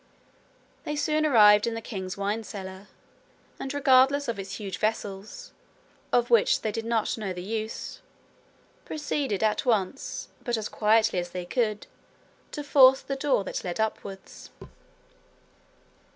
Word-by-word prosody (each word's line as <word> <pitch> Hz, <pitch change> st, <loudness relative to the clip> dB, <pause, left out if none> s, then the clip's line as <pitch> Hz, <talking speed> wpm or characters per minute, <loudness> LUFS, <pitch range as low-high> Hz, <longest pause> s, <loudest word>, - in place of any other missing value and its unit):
They 300 Hz, -, -3 dB
soon 305 Hz, +1 st, +1 dB
arrived 210 Hz, -5 st, +6 dB
in 230 Hz, -, -2 dB
the -, -, -3 dB
king's 190 Hz, -5 st, -6 dB
wine 205 Hz, +3 st, -2 dB
cellar, 190 Hz, -1 st, -8 dB, 0.7 s
and 270 Hz, -, -4 dB
regardless 280 Hz, 0 st, +4 dB
of 230 Hz, -4 st, -3 dB
its 195 Hz, 0 st, -6 dB
huge 195 Hz, -3 st, -6 dB
vessels, 215 Hz, -, -3 dB, 0.6 s
of 240 Hz, 0 st, +2 dB
which 230 Hz, -3 st, +4 dB
they 215 Hz, -, -1 dB
did 225 Hz, +1 st, -4 dB
not 230 Hz, -1 st, 0 dB
know 195 Hz, -3 st, -3 dB
the 180 Hz, 0 st, -7 dB
use, 220 Hz, +2 st, -5 dB, 0.8 s
proceeded 285 Hz, -8 st, -2 dB
at 215 Hz, -1 st, +1 dB
once, 225 Hz, 0 st, -1 dB
but 240 Hz, -3 st, -1 dB
as 220 Hz, 0 st, -4 dB
quietly 220 Hz, -2 st, +2 dB
as 175 Hz, 0 st, -4 dB
they 180 Hz, 0 st, -6 dB
could, 215 Hz, +1 st, -1 dB, 0.6 s
to 295 Hz, -, -6 dB
force 265 Hz, -2 st, +6 dB
the 275 Hz, -, -4 dB
door 270 Hz, -6 st, +1 dB
that -, -, -5 dB
led 180 Hz, +2 st, -4 dB
upwards. 200 Hz, -3 st, -5 dB
220 Hz, 140 wpm, -27 LUFS, 200-260 Hz, 0.8 s, arrived